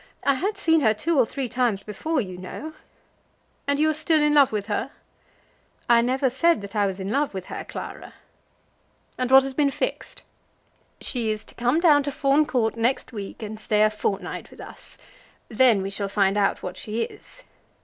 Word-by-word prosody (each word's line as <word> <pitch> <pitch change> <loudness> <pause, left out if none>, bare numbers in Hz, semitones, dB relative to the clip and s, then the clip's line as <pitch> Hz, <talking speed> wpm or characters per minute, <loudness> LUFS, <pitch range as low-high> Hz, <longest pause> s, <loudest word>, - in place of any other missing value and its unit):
I 280 - +3
had 395 +10 -2
seen 325 -5 +3
her 220 -4 +3
two 300 +7 0
or 240 - +4
three 270 +1 -4
times 235 -5 0
before, 295 +10 -2
you 185 -4 -6
know." 185 +13 -8 0.9
"And 285 0 +1
you 305 +2 +3
are - - -2
still 310 +1 +2
in 300 0 +3
love 285 -3 +5
with 210 -2 -2
her?" 220 +4 -2 1.0
"I 235 -1 +5
never 260 +3 +1
said 300 +2 +2
that 200 +2 -9
I 205 -1 +2
was 190 0 -5
in 190 +2 -4
love 280 -3 0
with 190 -1 -5
her, - - -5
Clara." - - -8 1.0
"And 255 -1 0
what 265 0 +8
has 270 0 -4
been 285 +1 +2
fixed?" - - -4 0.8
"She 235 -4 -2
is 215 0 -2
to - - -16
come 245 +6 +1
down 305 -4 +5
to 285 0 -3
Fawn 285 +1 +2
Court 230 -6 0
next 240 +2 -1
week, 205 +1 -7
and 215 0 -6
stay 210 -1 +2
a 215 - +4
fortnight 200 -3 -3
with - - -17
us. - - -12 0.5
Then 225 -3 +4
we 195 - -4
shall 200 0 -3
find 195 0 +2
out 200 -1 +1
what 180 - -6
she 225 +2 -3
is." - - -11
240 Hz, 200 wpm, -24 LUFS, 210-285 Hz, 1.0 s, what